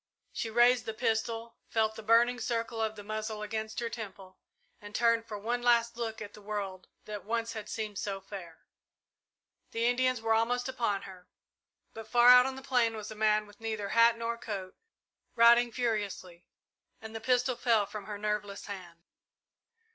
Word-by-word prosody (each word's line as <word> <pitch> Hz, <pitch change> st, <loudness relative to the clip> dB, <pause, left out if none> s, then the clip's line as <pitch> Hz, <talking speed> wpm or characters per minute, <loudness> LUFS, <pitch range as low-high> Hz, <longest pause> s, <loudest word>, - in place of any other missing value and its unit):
She 225 Hz, -, -3 dB
raised 240 Hz, +2 st, +4 dB
the 220 Hz, -, -3 dB
pistol, 225 Hz, 0 st, -1 dB
felt 220 Hz, -1 st, +1 dB
the 220 Hz, -, -9 dB
burning 235 Hz, +3 st, +4 dB
circle 230 Hz, -1 st, -2 dB
of 220 Hz, 0 st, -1 dB
the 205 Hz, -, -9 dB
muzzle 215 Hz, 0 st, -4 dB
against 220 Hz, +1 st, -4 dB
her 235 Hz, -, -1 dB
temple, 195 Hz, -5 st, -8 dB, 0.4 s
and 205 Hz, +1 st, -10 dB
turned 230 Hz, -1 st, +2 dB
for 210 Hz, -, -5 dB
one 235 Hz, +4 st, -2 dB
last 235 Hz, -1 st, +3 dB
look 225 Hz, -2 st, -4 dB
at 205 Hz, -, -10 dB
the 210 Hz, -, -13 dB
world 200 Hz, -3 st, -5 dB, 0.2 s
that 210 Hz, -1 st, -6 dB
once 230 Hz, +1 st, -2 dB
had 215 Hz, -2 st, -7 dB
seemed 215 Hz, -3 st, -4 dB
so 195 Hz, -1 st, -3 dB
fair. 190 Hz, -4 st, -10 dB, 1.0 s
The 230 Hz, +1 st, -1 dB
Indians 255 Hz, 0 st, +2 dB
were 225 Hz, 0 st, +1 dB
almost 245 Hz, +3 st, +1 dB
upon 230 Hz, -6 st, -1 dB
her, 185 Hz, -2 st, -12 dB, 0.7 s
but 225 Hz, -1 st, -9 dB
far 240 Hz, +2 st, +6 dB
out 250 Hz, +1 st, +9 dB
on 265 Hz, -, -4 dB
the 265 Hz, -, -9 dB
plain 245 Hz, -4 st, +2 dB
was 215 Hz, 0 st, -7 dB
a -, -, -7 dB
man 215 Hz, 0 st, +2 dB
with 205 Hz, 0 st, -18 dB
neither 220 Hz, -3 st, -3 dB
hat 230 Hz, +1 st, +5 dB
nor 230 Hz, 0 st, -3 dB
coat, 195 Hz, -5 st, -6 dB, 0.6 s
riding 235 Hz, +1 st, +6 dB
furiously, 205 Hz, -7 st, -3 dB, 0.5 s
and 220 Hz, 0 st, -9 dB
the 225 Hz, -, -5 dB
pistol 250 Hz, +1 st, +2 dB
fell 230 Hz, -4 st, +2 dB
from 205 Hz, 0 st, -8 dB
her 210 Hz, 0 st, -5 dB
nerveless 210 Hz, -1 st, -3 dB
hand. 175 Hz, -4 st, -9 dB
220 Hz, 180 wpm, -30 LUFS, 205-235 Hz, 1.0 s, out